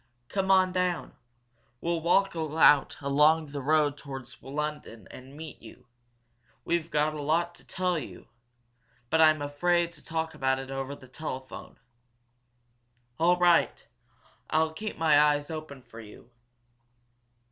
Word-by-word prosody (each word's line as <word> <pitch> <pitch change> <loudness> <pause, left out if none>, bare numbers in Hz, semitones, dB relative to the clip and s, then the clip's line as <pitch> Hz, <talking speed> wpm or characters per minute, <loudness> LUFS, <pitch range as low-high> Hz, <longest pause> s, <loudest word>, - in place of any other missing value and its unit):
"Come 195 -1 -1
on 185 -1 +5
down. 180 -1 -1 0.7
We'll 170 +2 -2
walk 195 +3 +2
out 155 -3 +3
along 150 +2 +3
the 140 -1 -5
road 145 0 +2
towards 135 -4 -9
London 145 -7 -5
and 130 +3 -12
meet 155 -3 -9
you. 115 - -14 0.8
We've 170 -1 -1
got 150 0 +1
a 150 - -5
lot 170 +4 0
to - - -17
tell 180 -2 -1
you, 140 - -10 0.8
but 160 0 +4
I'm 155 -2 +5
afraid 170 +4 0
to 150 - -15
talk 160 0 -3
about 130 0 0
it 135 0 -7
over 135 +1 -4
the 130 - -15
telephone." 130 -1 -8 1.4
"All 175 +2 +4
right! 175 -1 +3 0.6
I'll 160 0 +1
keep 215 +6 -6
my 155 -2 +5
eyes 145 0 +2
open 155 -4 -8
for 115 - -13
you." 115 +2 -14
155 Hz, 135 wpm, -28 LUFS, 140-170 Hz, 1.4 s, on